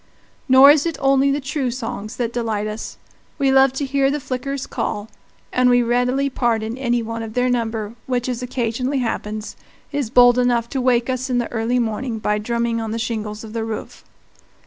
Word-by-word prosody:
Nor 265 Hz, +2 st, +9 dB
is 295 Hz, +2 st, +2 dB
it 330 Hz, -, -3 dB
only 275 Hz, 0 st, +3 dB
the 280 Hz, +1 st, +1 dB
true 270 Hz, -1 st, -2 dB
songs 225 Hz, -3 st, -5 dB
that 240 Hz, -1 st, -2 dB
delight 225 Hz, -3 st, -1 dB
us. 215 Hz, +1 st, -6 dB, 0.4 s
We 275 Hz, -1 st, +2 dB
love 265 Hz, 0 st, +5 dB
to 280 Hz, +1 st, -2 dB
hear 270 Hz, 0 st, +2 dB
the 295 Hz, +2 st, -1 dB
flickers 270 Hz, +1 st, -4 dB
call, 210 Hz, 0 st, -3 dB, 0.4 s
and 250 Hz, 0 st, +4 dB
we 245 Hz, 0 st, +4 dB
readily 250 Hz, +3 st, +1 dB
pardon 230 Hz, -4 st, -1 dB
any 240 Hz, -2 st, 0 dB
one 230 Hz, +1 st, -4 dB
of 220 Hz, -1 st, -7 dB
their 250 Hz, 0 st, +2 dB
number 225 Hz, -3 st, -2 dB
which, 250 Hz, -1 st, -1 dB
as 250 Hz, -1 st, -3 dB
occasionally 250 Hz, +2 st, -2 dB
happens, 215 Hz, -3 st, -3 dB, 0.4 s
is 285 Hz, -6 st, -2 dB
bold 245 Hz, 0 st, +6 dB
enough 240 Hz, -2 st, +2 dB
to 270 Hz, -, -2 dB
wake 245 Hz, -2 st, +2 dB
us 255 Hz, 0 st, -2 dB
in 250 Hz, -, +1 dB
the 240 Hz, -, -2 dB
early 230 Hz, +2 st, 0 dB
morning 230 Hz, 0 st, -2 dB
by 210 Hz, -1 st, 0 dB
drumming 235 Hz, +1 st, -1 dB
on 225 Hz, -, -4 dB
the 225 Hz, -, -2 dB
shingles 220 Hz, -2 st, -4 dB
of 220 Hz, -1 st, -9 dB
the 225 Hz, -1 st, -2 dB
roof. 225 Hz, -1 st, -6 dB
245 Hz, 195 wpm, -21 LUFS, 225-260 Hz, 0.4 s, Nor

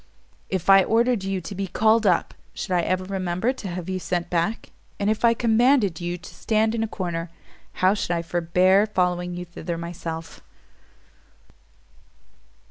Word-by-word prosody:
If 185 Hz, -3 st, -2 dB
I 195 Hz, -1 st, +7 dB
ordered 230 Hz, -1 st, +2 dB
you 195 Hz, -1 st, -2 dB
to 165 Hz, -, -7 dB
be 195 Hz, 0 st, -3 dB
called 220 Hz, +3 st, +3 dB
up, 180 Hz, -3 st, +2 dB, 0.2 s
should -, -, -5 dB
I 180 Hz, -1 st, +3 dB
ever 185 Hz, +2 st, -1 dB
remember 185 Hz, +4 st, -1 dB
to 220 Hz, -, -8 dB
have 180 Hz, -1 st, -5 dB
you 185 Hz, 0 st, -2 dB
sent 175 Hz, -1 st, -3 dB
back? 175 Hz, +6 st, -1 dB, 0.3 s
And 205 Hz, +1 st, +1 dB
if 220 Hz, -, -3 dB
I 230 Hz, 0 st, +5 dB
commanded 230 Hz, -, +3 dB
you 175 Hz, +1 st, -3 dB
to 180 Hz, -, -13 dB
stand 220 Hz, 0 st, +1 dB
in 230 Hz, -, -1 dB
a 225 Hz, -, 0 dB
corner, 170 Hz, -4 st, -4 dB, 0.6 s
how 190 Hz, -, +6 dB
should 205 Hz, -, -3 dB
I 170 Hz, -1 st, 0 dB
forbear 180 Hz, +4 st, +3 dB
following 180 Hz, -3 st, -1 dB
you 180 Hz, -, -5 dB
thither 170 Hz, 0 st, -6 dB
myself?" 165 Hz, -1 st, -6 dB
185 Hz, 165 wpm, -24 LUFS, 175-215 Hz, 0.6 s, I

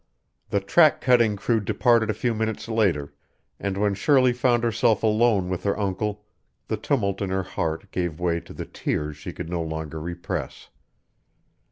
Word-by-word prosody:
The 100 Hz, -, +1 dB
track 155 Hz, -, +4 dB
cutting 120 Hz, -5 st, +3 dB
crew 110 Hz, +3 st, +1 dB
departed 115 Hz, +2 st, +2 dB
a 110 Hz, -, 0 dB
few 120 Hz, +2 st, 0 dB
minutes 110 Hz, 0 st, -3 dB
later, 90 Hz, -11 st, 0 dB, 0.5 s
and 100 Hz, -1 st, -2 dB
when 100 Hz, 0 st, +1 dB
Shirley 130 Hz, +4 st, +3 dB
found 120 Hz, -1 st, +2 dB
herself 115 Hz, -2 st, +2 dB
alone 110 Hz, -3 st, +3 dB
with 90 Hz, -1 st, -3 dB
her 100 Hz, -, 0 dB
uncle, 105 Hz, +1 st, -2 dB, 0.4 s
the -, -, +1 dB
tumult 100 Hz, -8 st, -1 dB
in 100 Hz, -, -1 dB
her 95 Hz, 0 st, -1 dB
heart 80 Hz, -2 st, -4 dB
gave 85 Hz, -3 st, -2 dB
way 85 Hz, -1 st, 0 dB
to -, -, -13 dB
the -, -, -6 dB
tears 75 Hz, 0 st, -3 dB
she 75 Hz, -, -7 dB
could 80 Hz, -, -7 dB
no 85 Hz, -1 st, -1 dB
longer 80 Hz, -1 st, -5 dB
repress. 85 Hz, +2 st, -5 dB
100 Hz, 170 wpm, -24 LUFS, 90-115 Hz, 0.5 s, track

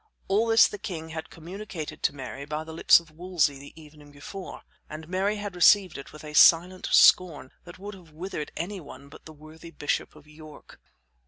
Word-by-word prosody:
All 210 Hz, +4 st, +1 dB
this 225 Hz, 0 st, +6 dB
the 205 Hz, -, -9 dB
king 175 Hz, -7 st, -7 dB
had 160 Hz, 0 st, -7 dB
communicated 175 Hz, -1 st, -8 dB
to -, -, 0 dB
Mary 135 Hz, 0 st, -8 dB
by 150 Hz, +2 st, -5 dB
the 160 Hz, 0 st, -10 dB
lips 165 Hz, -, +5 dB
of 165 Hz, -2 st, -18 dB
Wolsey 160 Hz, -4 st, -1 dB
the 145 Hz, +3 st, -14 dB
evening 150 Hz, -1 st, -16 dB
before, 180 Hz, +7 st, -10 dB, 0.3 s
and 155 Hz, +1 st, -9 dB
Mary 190 Hz, +4 st, -1 dB
had 205 Hz, -2 st, -6 dB
received 185 Hz, 0 st, +4 dB
it 140 Hz, -, -9 dB
with 155 Hz, -, -13 dB
a 150 Hz, 0 st, -9 dB
silent 175 Hz, +4 st, +4 dB
scorn 160 Hz, -7 st, +4 dB
that 175 Hz, -, -12 dB
would 205 Hz, +2 st, -9 dB
have 180 Hz, -4 st, -15 dB
withered 155 Hz, -1 st, -7 dB
any 190 Hz, +4 st, -5 dB
one 140 Hz, -3 st, -13 dB
but 145 Hz, -, -16 dB
the 160 Hz, -, -11 dB
worthy 155 Hz, +2 st, -14 dB
bishop 150 Hz, -2 st, -3 dB
of 155 Hz, -1 st, -17 dB
York. 150 Hz, 0 st, -15 dB
160 Hz, 195 wpm, -26 LUFS, 150-185 Hz, 0.3 s, this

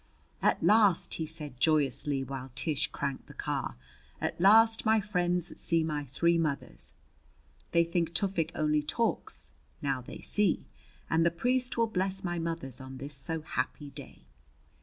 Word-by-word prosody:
"At -, -, +2 dB
last," 205 Hz, -5 st, +4 dB
he 160 Hz, -, -2 dB
said 150 Hz, -5 st, -4 dB
joyously 145 Hz, -2 st, +2 dB
while 135 Hz, 0 st, -6 dB
Tish 145 Hz, +2 st, 0 dB
cranked 140 Hz, -2 st, -4 dB
the -, -, -13 dB
car -, -, -3 dB, 0.4 s
"at -, -, -3 dB
last 225 Hz, +3 st, +6 dB
my 220 Hz, 0 st, +4 dB
friends 180 Hz, -4 st, -1 dB
see 165 Hz, -1 st, +2 dB
my 150 Hz, -2 st, -2 dB
three 170 Hz, +6 st, +2 dB
mothers! 150 Hz, -4 st, -2 dB, 0.8 s
They 170 Hz, -, +5 dB
think 170 Hz, 0 st, -1 dB
Tufik 175 Hz, -4 st, 0 dB
only 150 Hz, -1 st, +2 dB
talks 230 Hz, +10 st, -1 dB, 0.3 s
now 135 Hz, -3 st, -1 dB
they 125 Hz, -, -9 dB
see! 205 Hz, -4 st, +1 dB, 0.4 s
And 160 Hz, +1 st, +2 dB
the 170 Hz, -, +5 dB
priest 250 Hz, +8 st, 0 dB
will 230 Hz, -, +4 dB
bless 190 Hz, -2 st, -1 dB
my 175 Hz, -1 st, -2 dB
mothers 165 Hz, -6 st, -4 dB
on 130 Hz, 0 st, -8 dB
this 140 Hz, +2 st, -4 dB
so 160 Hz, +4 st, 0 dB
happy 145 Hz, -1 st, -3 dB
day." 135 Hz, -, -11 dB
165 Hz, 155 wpm, -30 LUFS, 140-185 Hz, 0.8 s, last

